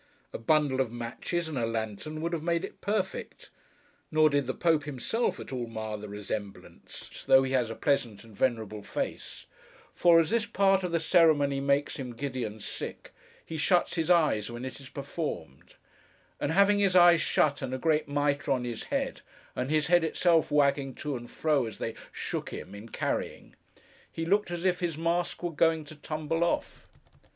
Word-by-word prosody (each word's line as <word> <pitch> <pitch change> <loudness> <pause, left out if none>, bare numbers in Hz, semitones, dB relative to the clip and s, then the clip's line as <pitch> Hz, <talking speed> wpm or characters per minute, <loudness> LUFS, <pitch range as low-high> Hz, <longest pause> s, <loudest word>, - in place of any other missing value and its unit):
A - - -4
bundle 140 +1 +2
of 120 -4 -2
matches 120 +8 -3
and 150 -5 -3
a 115 - +1
lantern, 115 +7 -4
would 170 +1 -2
have 165 - -1
made 170 +2 0
it - - -13
perfect. 215 - -3 0.6
Nor 155 -1 +4
did 140 -2 +1
the 130 - -1
Pope, 160 -4 +2
himself, 150 - -1
at - - -8
all 120 -2 -3
mar 110 -1 -5
the 105 0 -8
resemblance, 105 0 -7
though 135 0 +7
he 130 - -2
has 125 -4 +1
a 115 - -5
pleasant 120 -7 0
and 110 -2 -15
venerable 110 -3 -1
face; - - -5 0.5
for, 170 -1 +6
as 165 +2 +1
this 230 -2 +1
part 195 0 +3
of 180 -2 -3
the 170 - +2
ceremony 155 -5 +4
makes 140 +1 +1
him 125 -4 -6
giddy 130 0 -3
and 110 -1 -6
sick, - - -7 0.3
he 160 - -5
shuts 175 +3 +2
his 165 -1 -1
eyes 155 - +3
when 120 +2 -6
it 130 - -7
is 135 -2 -12
performed: 140 - -6 0.6
and 145 - -1
having 200 +3 +4
his 195 -2 +2
eyes 175 -2 +7
shut 145 -1 +2
and 130 -2 -3
a 130 - -2
great 155 +2 +1
mitre 145 0 0
on 125 -2 -1
his 120 -2 -5
head, - - -2 0.3
and 125 +1 -2
his 155 -1 +2
head 175 +1 +4
itself 165 0 +2
wagging 140 -2 +2
to 150 -2 -4
and 120 -1 -7
fro 150 -6 +1
as 110 - -8
they - - -3 0.2
shook - - -4
him 95 - -8
in 105 +3 -10
carrying, - - -3 0.6
he 165 - -4
looked 200 +3 +2
as 175 +1 -4
if 180 -1 +2
his 170 -4 -2
mask 170 +2 -1
were 175 - -1
going 160 0 +2
to 155 - -11
tumble 155 +2 -2
off. 170 - -2
145 Hz, 190 wpm, -29 LUFS, 125-170 Hz, 0.6 s, though